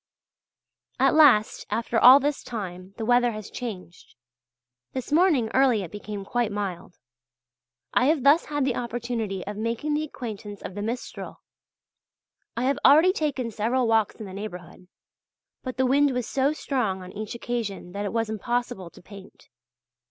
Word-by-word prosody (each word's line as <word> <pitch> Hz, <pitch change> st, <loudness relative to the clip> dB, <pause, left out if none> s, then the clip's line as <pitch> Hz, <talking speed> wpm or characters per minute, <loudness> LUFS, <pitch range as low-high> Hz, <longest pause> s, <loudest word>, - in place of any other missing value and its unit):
At -, -, +4 dB
last, 265 Hz, -9 st, +4 dB
after 230 Hz, 0 st, 0 dB
all 260 Hz, +3 st, +9 dB
this 285 Hz, +1 st, -1 dB
time, 190 Hz, -4 st, -7 dB
the 225 Hz, -, -3 dB
weather 245 Hz, 0 st, +3 dB
has 215 Hz, -1 st, -8 dB
changed. 190 Hz, -8 st, -8 dB, 0.8 s
This 260 Hz, +1 st, -5 dB
morning 300 Hz, -9 st, +3 dB
early 255 Hz, -6 st, +3 dB
it 170 Hz, -, -8 dB
became 205 Hz, -1 st, -7 dB
quite 240 Hz, 0 st, -1 dB
mild. 190 Hz, -4 st, -5 dB, 1.0 s
I 250 Hz, -, +3 dB
have 295 Hz, -2 st, +2 dB
thus 290 Hz, +4 st, +5 dB
had 290 Hz, -2 st, -1 dB
the 260 Hz, -3 st, 0 dB
opportunity 235 Hz, -5 st, -3 dB
of 205 Hz, +1 st, -6 dB
making 230 Hz, +7 st, -2 dB
the 300 Hz, +1 st, 0 dB
acquaintance 215 Hz, -8 st, -7 dB
of -, -, -6 dB
the 205 Hz, -, -5 dB
Mistral. 235 Hz, +4 st, -6 dB, 1.2 s
I 240 Hz, -, 0 dB
have 270 Hz, +2 st, +1 dB
already 315 Hz, +7 st, +7 dB
taken 275 Hz, -, -2 dB
several 235 Hz, +4 st, 0 dB
walks 225 Hz, -2 st, +2 dB
in 220 Hz, -, -8 dB
the 190 Hz, -, -9 dB
neighbourhood; 180 Hz, -3 st, -8 dB, 0.7 s
but 255 Hz, -2 st, -6 dB
the 260 Hz, -, +2 dB
wind 285 Hz, +3 st, +4 dB
was 250 Hz, -2 st, -1 dB
so 275 Hz, +1 st, +1 dB
strong 235 Hz, -11 st, -2 dB
on 180 Hz, -, -10 dB
each 215 Hz, +2 st, -6 dB
occasion 230 Hz, -7 st, -4 dB
that 200 Hz, +2 st, -4 dB
it 200 Hz, -, -3 dB
was 225 Hz, -1 st, 0 dB
impossible 220 Hz, -4 st, -3 dB
to -, -, -18 dB
paint. 200 Hz, -1 st, -14 dB
230 Hz, 160 wpm, -25 LUFS, 205-260 Hz, 1.2 s, all